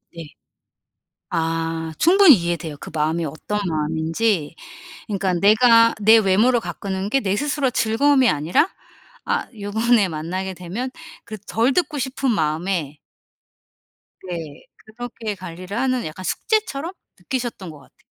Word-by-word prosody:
네. 165 Hz, -1 st, -7 dB, 1.0 s
아 165 Hz, 0 st, -2 dB
충분히 355 Hz, -, +7 dB
이해돼요. 170 Hz, -3 st, -3 dB
그 -, -, -9 dB
마음이 160 Hz, +2 st, 0 dB
어떤 160 Hz, +8 st, -4 dB
마음인지. 160 Hz, +3 st, -1 dB, 0.5 s
그니까 195 Hz, -3 st, -1 dB
내가 230 Hz, +5 st, +5 dB
내 220 Hz, +2 st, +7 dB
외모를 220 Hz, +4 st, +3 dB
가꾸는 195 Hz, -2 st, -4 dB
게 270 Hz, -, +2 dB
내 195 Hz, -1 st, -1 dB
스스로 285 Hz, +1 st, 0 dB
즐거움이 255 Hz, +3 st, +3 dB
아니라 160 Hz, -, +2 dB, 0.6 s
아 -, -, -1 dB
요번에 215 Hz, +1 st, +2 dB
만나게 180 Hz, +4 st, -4 dB
되면 185 Hz, +9 st, -5 dB, 0.3 s
그 215 Hz, -, -7 dB
덜 230 Hz, +4 st, +1 dB
듣고 305 Hz, -2 st, 0 dB
싶은 265 Hz, 0 st, -1 dB
마음에 160 Hz, -4 st, -1 dB, 1.3 s
네 165 Hz, -4 st, -7 dB
그렇게 225 Hz, -1 st, -7 dB
관리를 185 Hz, +3 st, -7 dB
하는 255 Hz, -1 st, 0 dB
약간 155 Hz, +4 st, -7 dB
숙제처럼 350 Hz, -, -1 dB, 0.3 s
느끼셨던 240 Hz, -8 st, -4 dB
것 155 Hz, -2 st, -11 dB
같아요. 135 Hz, -, -23 dB
200 Hz, 280 characters per minute, -21 LUFS, 165-245 Hz, 1.3 s, 충분히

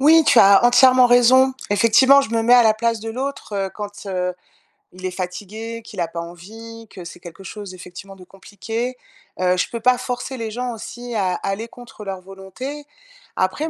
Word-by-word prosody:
Oui, 320 Hz, +4 st, +6 dB
tu 245 Hz, -, +5 dB
as 200 Hz, +2 st, +6 dB
entièrement 255 Hz, +1 st, +6 dB
raison. 255 Hz, +2 st, +5 dB, 0.2 s
Effectivement, 230 Hz, +7 st, +5 dB
je 275 Hz, -, -4 dB
me 230 Hz, 0 st, 0 dB
mets 235 Hz, +2 st, +3 dB
à 245 Hz, -1 st, +8 dB
la 220 Hz, -1 st, +4 dB
place 230 Hz, 0 st, -1 dB
de 225 Hz, -, -7 dB
l'autre, 265 Hz, -2 st, -5 dB
heu, 195 Hz, -1 st, -2 dB
quand, 205 Hz, -1 st, -8 dB
heu, 180 Hz, -1 st, -2 dB, 0.6 s
il 185 Hz, +1 st, -10 dB
est 185 Hz, -, -2 dB
fatigué, 210 Hz, +5 st, -6 dB
qu'il 205 Hz, -4 st, -7 dB
a 170 Hz, -, -2 dB
pas 170 Hz, 0 st, -6 dB
envie, 220 Hz, +7 st, -10 dB
que 180 Hz, -, -10 dB
c'est 170 Hz, +1 st, -11 dB
quelque 175 Hz, +2 st, -12 dB
chose 205 Hz, -1 st, -9 dB
effectivement, 185 Hz, +2 st, -11 dB
de 185 Hz, -, -14 dB
compliqué. 225 Hz, +6 st, -6 dB, 0.4 s
Heu, 180 Hz, 0 st, +2 dB
je 180 Hz, -, -1 dB
peux 235 Hz, -, -5 dB
pas 250 Hz, +2 st, +3 dB
forcer 250 Hz, +1 st, -5 dB
les 225 Hz, -1 st, -5 dB
gens 245 Hz, +2 st, -4 dB
aussi 240 Hz, +2 st, -8 dB
à 185 Hz, -4 st, 0 dB
à -, -, -6 dB
aller 220 Hz, +4 st, -4 dB
contre 240 Hz, -3 st, -13 dB
leur 195 Hz, -2 st, -5 dB
volonté. 195 Hz, +10 st, -9 dB, 0.5 s
Après 240 Hz, +13 st, -1 dB
220 Hz, 200 wpm, -20 LUFS, 190-245 Hz, 0.6 s, à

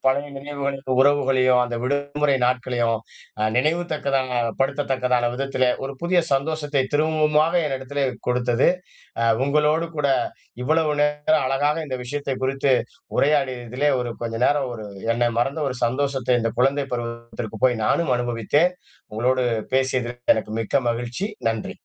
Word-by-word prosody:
பழைய 140 Hz, +2 st, +2 dB
நினைவுகள், 140 Hz, 0 st, -3 dB, 0.2 s
உறவுகளையும், 130 Hz, -3 st, +4 dB
அந்த 120 Hz, -1 st, -4 dB
விடுமுறை 145 Hz, +1 st, 0 dB
நாட்களையும் 120 Hz, -2 st, +1 dB, 0.4 s
அ -, -, +1 dB
நினைவு 160 Hz, +7 st, +2 dB
தக்கதாக 135 Hz, -4 st, 0 dB, 0.2 s
படுத்தத்தக்கதான 130 Hz, -3 st, +1 dB
விதத்திலே 130 Hz, -1 st, 0 dB, 0.2 s
ஒரு 135 Hz, -, -4 dB
புதிய 175 Hz, +1 st, +2 dB
சந்தோசத்தை 145 Hz, 0 st, 0 dB
திரும்பவுமாக 155 Hz, +1 st, +2 dB
என்னிடத்திலே 135 Hz, 0 st, -2 dB, 0.2 s
கொடுத்தது, 125 Hz, 0 st, +2 dB, 0.5 s
அ -, -, +2 dB, 0.2 s
உங்களோடு 150 Hz, +3 st, +2 dB
கூட 145 Hz, -1 st, +1 dB, 0.5 s
இவ்வளவு 155 Hz, +3 st, +2 dB
நேரம் 150 Hz, 0 st, +2 dB
அழகாக 145 Hz, +3 st, +1 dB
இந்த 130 Hz, -2 st, -4 dB
விஷயத்தைக் 140 Hz, 0 st, -4 dB
குறித்து 135 Hz, +1 st, +1 dB, 0.5 s
உரையாடியதிலே, 135 Hz, -1 st, +1 dB
ஒரு 120 Hz, -1 st, -3 dB
கொஞ்ச 115 Hz, -1 st, -3 dB
நேரம் 145 Hz, -3 st, +1 dB
ஒரு 110 Hz, -2 st, -7 dB, 0.3 s
என்னை 120 Hz, 0 st, +2 dB
மறந்த 135 Hz, +5 st, -1 dB
ஒரு 125 Hz, -, -5 dB
சந்தோசத்தை 130 Hz, 0 st, +1 dB
இந்தக் 115 Hz, +1 st, -3 dB
குழந்தைப் 135 Hz, 0 st, +1 dB
பருவத்திற்கு 115 Hz, -2 st, -6 dB
போய் 120 Hz, -3 st, 0 dB
நானும் 160 Hz, -7 st, +2 dB
அனுபவித்தேன். 120 Hz, -, +1 dB, 0.4 s
உங்களோடு 125 Hz, +3 st, +1 dB, 0.3 s
பேசியதற்கு 125 Hz, -2 st, +1 dB
எனக்கு 110 Hz, 0 st, -4 dB
மிக்க 130 Hz, +4 st, 0 dB
மகிழ்ச்சி. 120 Hz, -, -3 dB, 0.2 s
நன்றி. 115 Hz, -2 st, -5 dB
135 Hz, 130 wpm, -23 LUFS, 125-145 Hz, 0.5 s, உறவுகளையும்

